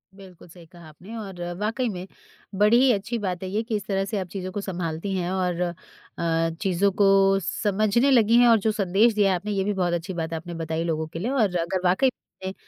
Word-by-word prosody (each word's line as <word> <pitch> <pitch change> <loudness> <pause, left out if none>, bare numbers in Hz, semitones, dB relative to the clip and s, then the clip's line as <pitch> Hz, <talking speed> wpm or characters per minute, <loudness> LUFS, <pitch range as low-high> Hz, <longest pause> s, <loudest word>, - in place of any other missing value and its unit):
बिल्कुल 185 -3 -14
सही 170 0 -15
कहा 170 -1 -15
आपने 180 +9 -12
और 195 -5 -7 0.2
वाक़ई 225 +4 -1
में, 185 -2 -6 0.5
बड़ी 210 +4 +5
ही 265 -1 +5
अच्छी 230 +4 -3
बात 185 -3 -3
है 185 - -4
ये 215 +3 -1
कि 225 -1 -3
इस 205 -1 -3
तरह 195 -1 0
से 205 +2 -3
आप 185 - -4
चीज़ों 185 0 -6
को 200 +2 -4
संभालती 175 0 -4
हैं 180 -1 -2
और 180 -2 -1
अ, 175 -1 -1 0.9
चीज़ों 195 0 +2
को 195 0 +5
समझने 215 +8 +1
लगीं 230 -2 +5
हैं 245 - +6
और 225 -2 +6
जो 220 +2 +1
संदेश 205 +3 +2
दिया 205 -2 +3
है 185 - +2
आपने 205 +4 -4
ये 195 -1 0
भी 205 +1 -1
बहुत 180 -2 0
अच्छी 175 +3 -3
बात 165 -1 -4
आपने 165 +2 -5
बताई 165 0 -3
लोगों 160 -1 -2
के 165 +1 -7
लिए। 225 +9 -2
और 215 -9 +1
अगर 170 +2 -1
वाक़ई 190 +9 +3 0.4
में 190 - -3
195 Hz, 230 wpm, -24 LUFS, 175-210 Hz, 0.9 s, हैं